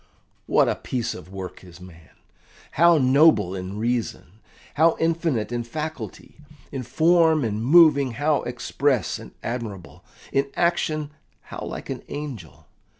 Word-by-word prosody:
What - - +3
a - - +2
piece 120 -3 -3
of 90 0 -11
work 95 -1 -8
is 90 -2 -14
a 90 - -14
man! 85 -3 -15 0.6
How 170 +1 +5
noble 130 - +4
in 95 +2 -6
reason! 110 -5 -3 0.3
How 160 +2 +3
infinite 160 -9 0
in 120 -1 -2
faculty! 155 +5 -7 0.3
In 135 - -4
form 160 +4 +3
and 110 -1 -2
moving 140 -3 +5
how 145 +4 +1
express 125 +1 -1
and - - -11
admirable! 115 -7 -6 0.3
In 140 0 +1
action 155 -3 0 0.3
how - - -10
like - - -6
an - - -5
angel! 135 - -8
130 Hz, 140 wpm, -23 LUFS, 105-155 Hz, 0.6 s, How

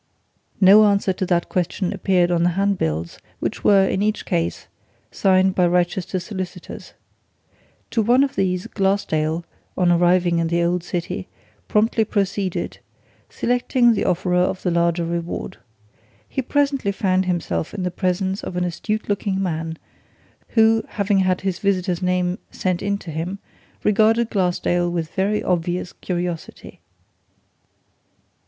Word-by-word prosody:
no 200 +3 +8
answer 200 -2 +2
to 185 0 -3
that 175 -1 +1
question 180 +1 -1
appeared 185 -3 +2
on 170 -1 +2
the 175 - +3
handbills, 85 - -1 0.2
which - - -3
were, 195 -2 +5
in 190 - -1
each 215 +1 0
case, 85 0 -2 0.5
signed 190 0 +3
by 185 - +2
Wrychester 180 +1 +1
solicitors. 185 -1 -7 1.0
To 225 - +2
one 245 +5 +4
of 275 - -1
these 185 -1 0
Glassdale, 170 -5 0 0.3
on 180 -1 +3
arriving 175 0 +3
in 165 - +1
the 170 +1 +1
old 175 0 0
city, 175 -1 -4 0.4
promptly 220 +1 +2
proceeded 200 -3 -2 0.5
selecting 245 0 +2
the - - -1
offerer 180 0 +1
of 180 +1 0
the 180 - +1
larger 170 0 +1
reward. 170 0 -4 0.7
He - - -2
presently 275 -4 0
found 190 -2 +1
himself 165 - -2
in 190 - -4
the 180 - -1
presence 185 +2 -1
of 180 - -6
an 180 - 0
astute 210 +5 -3
looking 200 -1 -1
man 165 -3 -3 0.7
who, 225 -1 +3
having 200 -1 0
had 185 -1 +1
his 190 -2 -2
visitor's 185 -3 0
name 180 0 0
sent 185 -1 -2
in 200 0 0
to 175 -4 -9
him, 165 +5 -4 0.5
regarded 220 +2 +3
Glassdale 175 -2 +1
with 165 -2 -3
very 205 +2 0
obvious 175 0 -1
curiosity. 175 -2 -5
185 Hz, 140 wpm, -21 LUFS, 175-200 Hz, 1.0 s, no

